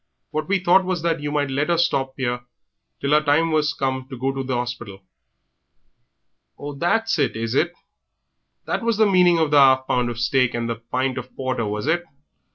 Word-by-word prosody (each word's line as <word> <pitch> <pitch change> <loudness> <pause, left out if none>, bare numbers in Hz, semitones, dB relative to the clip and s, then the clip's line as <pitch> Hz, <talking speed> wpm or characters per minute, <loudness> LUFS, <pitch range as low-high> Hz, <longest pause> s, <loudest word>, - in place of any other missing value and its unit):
What 155 0 -3
we 200 - +2
thought 185 +1 +4
was 180 -3 -2
that 165 -2 0
you 145 0 -4
might 145 -2 -1
let 145 +4 -1
her 170 - +2
stop 135 -6 0
'ere 125 -2 -2 0.6
till 140 - -2
her 150 +1 +5
time 155 +2 +2
was 150 -1 +1
come 130 -1 -2
to 130 - -7
go 135 +2 -1
to 135 0 -4
the 130 -1 -2
'orspital." 120 -5 -5 1.6
"Ah, 145 0 -6
that's 200 +6 0
it, 140 - +1
is 115 +1 -3
it? 170 +5 +2 0.9
That - - -2
was 230 -2 0
the 220 - +5
meaning 180 -3 +4
of 160 -2 +1
the 150 - +5
'alf 130 -1 +5
pound 125 -2 0
of 120 - -5
steak 125 +1 +1
and 120 0 -2
the 115 -1 -3
pint 130 +3 -2
of 125 +1 -11
porter, 130 -4 -2
was 105 +2 -3
it. 170 +3 +1
140 Hz, 205 wpm, -22 LUFS, 125-165 Hz, 1.6 s, her